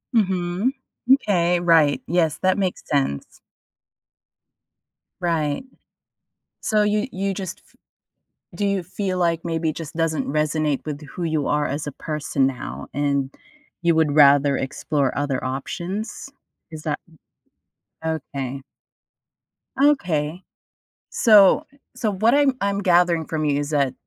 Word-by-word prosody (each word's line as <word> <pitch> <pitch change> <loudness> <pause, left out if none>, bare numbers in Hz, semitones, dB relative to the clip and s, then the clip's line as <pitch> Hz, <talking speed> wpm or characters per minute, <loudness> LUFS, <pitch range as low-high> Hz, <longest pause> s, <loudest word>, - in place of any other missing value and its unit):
Mhm. 190 +2 +1 0.4
M'kay, 180 -9 +3
right, 165 -4 +4
yes, 165 -2 +1
that 185 +1 +2
makes 190 -2 -1
sense. 135 - -1 1.8
Right. 160 - 0 1.0
So 215 -2 +2
you 210 +3 +1
you 195 +1 -2
just 190 -2 -6
f - - -27 0.8
do 205 - -1
you 200 -2 +1
feel 185 +1 -3
like 170 -2 +1
maybe 165 -1 -1
it 155 - -4
just 160 -2 -7
doesn't 165 -2 0
resonate 150 -1 0
with 150 -1 -5
who 170 +5 -7
you 155 -3 0
are 150 0 +1
as 145 +2 -3
a 145 - -4
person 145 -2 -1
now 70 - -6
and 140 -1 0 0.5
you 170 0 +3
would 155 -2 +2
rather 140 -1 +6
explore 135 0 -1
other 140 -2 -1
options? 175 - -4 0.4
Is 155 -1 -8
that 150 -2 -2 1.1
Okay. 140 -4 -4 1.2
Okay. 175 - +1 0.7
So 210 +6 +5 0.3
so 220 -4 -1
what 220 +5 +2
I'm 285 -1 +4
I'm 200 0 0
gathering 175 -3 +3
from 155 -1 -2
you 145 -1 +1
is 145 - -3
that, 140 -3 +1
160 Hz, 125 wpm, -22 LUFS, 145-185 Hz, 1.8 s, rather